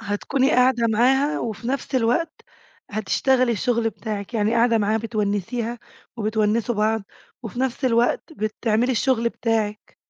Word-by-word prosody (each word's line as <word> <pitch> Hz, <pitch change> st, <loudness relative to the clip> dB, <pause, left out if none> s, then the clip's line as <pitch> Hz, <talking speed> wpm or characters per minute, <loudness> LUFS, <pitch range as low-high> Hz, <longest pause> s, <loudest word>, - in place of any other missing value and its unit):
هتكوني 225 Hz, +6 st, 0 dB
قاعدة 250 Hz, -3 st, +3 dB
معاها 265 Hz, +7 st, +2 dB
وفي 225 Hz, +1 st, -4 dB
نفس 270 Hz, 0 st, -3 dB
الوقت 255 Hz, +7 st, +1 dB, 0.6 s
هتشتغلي 245 Hz, +4 st, +1 dB
الشغل 235 Hz, 0 st, 0 dB
بتاعِك، 215 Hz, +1 st, -6 dB
يعني 215 Hz, +1 st, +1 dB
قاعدة 235 Hz, 0 st, +3 dB
معاها 215 Hz, +1 st, +1 dB
بتونِّسيها 225 Hz, +2 st, -2 dB, 0.4 s
وبتونِّسوا 220 Hz, +2 st, 0 dB
بعض 215 Hz, +1 st, +1 dB, 0.4 s
وفي 230 Hz, +2 st, -6 dB
نفس 265 Hz, +1 st, -2 dB
الوقت 240 Hz, +6 st, +1 dB
بتعملي 220 Hz, +1 st, 0 dB
الشغل 235 Hz, -1 st, +1 dB
بتاعِك. 220 Hz, -3 st, -2 dB
230 Hz, 125 wpm, -23 LUFS, 215-250 Hz, 0.6 s, قاعدة